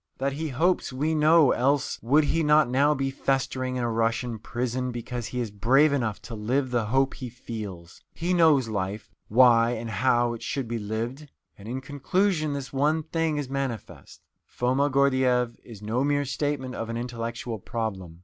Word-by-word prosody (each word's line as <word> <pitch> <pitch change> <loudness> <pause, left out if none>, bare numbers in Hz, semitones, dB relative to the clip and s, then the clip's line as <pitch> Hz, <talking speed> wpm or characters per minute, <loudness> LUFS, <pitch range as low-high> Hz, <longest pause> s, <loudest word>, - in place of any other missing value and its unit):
That 135 +1 -1
he 160 +3 -3
hopes, 165 +7 +1
we 150 +5 -1
know, 155 -2 +5
else 140 +2 +1
would 145 +7 +4
he 165 +3 +1
not 150 -2 +4
now 140 +4 +3
be 135 0 -1
festering 130 -1 -1
in 125 - -1
a 120 - 0
Russian 115 +1 -1
prison 125 +3 -3
because 120 -1 -5
he 125 - -4
is 115 -4 -3
brave 135 +9 +3
enough 115 -7 -1
to 115 - -8
live 125 +5 -1
the 120 -3 +1
hope 135 +3 +2
he 125 -2 -7
feels. 105 -7 -8
He 175 +2 -2
knows 155 -8 +4
life, 105 0 -4 0.2
why 120 0 +5
and 115 -1 -5
how 120 +2 +2
it 115 - -8
should 135 -4 -3
be 115 0 -3
lived. 115 +8 -4 0.3
And 100 - -13
in 130 +3 -4
conclusion, 155 +4 0
this 140 -2 -6
one 150 +4 +1
thing 160 -1 -1
is 145 -2 -3
manifest: 135 -4 -5 0.2
Foma 130 +4 0
Gordyeeff 130 -3 +2
is 110 -4 -12
no 115 +5 0
mere 145 0 +1
statement 130 -1 -2
of 115 -2 -5
an 115 - -3
intellectual 115 -1 -4
problem. 95 -7 -5
125 Hz, 180 wpm, -26 LUFS, 115-140 Hz, 0.3 s, know